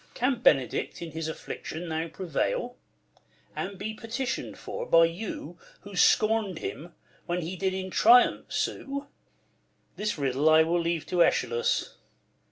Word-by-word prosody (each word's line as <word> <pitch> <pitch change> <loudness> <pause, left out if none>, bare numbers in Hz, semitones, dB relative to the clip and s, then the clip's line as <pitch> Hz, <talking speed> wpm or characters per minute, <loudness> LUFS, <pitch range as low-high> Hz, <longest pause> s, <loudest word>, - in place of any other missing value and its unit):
Can 250 -1 0
Benedick 135 - +2
in 170 -2 -7
his 160 +1 -4
affliction 160 +1 -6
now 160 +1 -2
Prevail; 195 - -2 0.8
and 195 +1 -4
be 220 +3 -4
petition'd 230 +4 -4
for - - -6
by 165 0 +6
you 170 -1 -6 0.2
Who 200 -1 -10
scorn'd 215 -1 +3
him 165 +2 -7 0.3
when 175 0 -1
he 170 +4 -4
did 190 +1 -1
in 190 0 -4
triumph 240 +5 +5
sue - - -2
1 280 - -20 0.9
This 210 -3 -2
riddle 140 +2 +2
I 160 0 +7
will 170 +2 +1
leave 165 -2 -1
to 175 +2 +1
Eschalus. 120 -1 0
175 Hz, 145 wpm, -28 LUFS, 160-210 Hz, 0.9 s, I